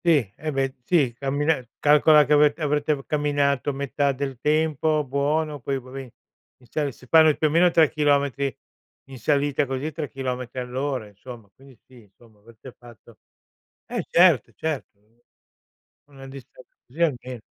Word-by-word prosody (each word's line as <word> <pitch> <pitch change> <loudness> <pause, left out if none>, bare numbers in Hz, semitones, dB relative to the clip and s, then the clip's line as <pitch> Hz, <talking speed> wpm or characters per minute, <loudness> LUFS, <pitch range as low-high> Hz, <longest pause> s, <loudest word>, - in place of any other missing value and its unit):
Sì, 140 - +2
eh 155 +1 -5
beh, 135 -1 -1
sì 140 -6 +2
cammina 140 +3 -1 0.2
calcola 150 +1 +5
che 150 - +2
avete 150 +1 +4
avrete 150 -1 -1
camminato 145 -2 0
metà 140 +1 -1
del 135 -2 -5
tempo, 155 0 +1
buono. 145 +3 -1
Poi 135 +2 -3
vabbè 130 0 -10 0.5
inizia 140 +4 -3
si 125 - -18
fanno 160 +3 +6
più - - -1
o - - -4
meno 170 +3 +4
3 165 -2 +4
chilometri 140 -3 0 0.5
in 130 -2 -10
salita 140 +2 0
così, 135 +4 -3
3 150 -2 -5
chilometri 125 -2 -5
all'ora 130 -1 -3
insomma. 110 +2 -12
Quindi 135 -2 -19
sì 125 -2 -17
insomma 105 +1 -23
avete 115 +4 -15
fatto 120 -3 -17 0.7
eh - - -4
certo, 170 - +4
certo. 145 -9 -5 1.1
Una 135 -1 -12
distanza 135 -1 -14
così 135 +7 -13
almeno. 130 -6 -1
140 Hz, 145 wpm, -23 LUFS, 130-150 Hz, 1.1 s, fanno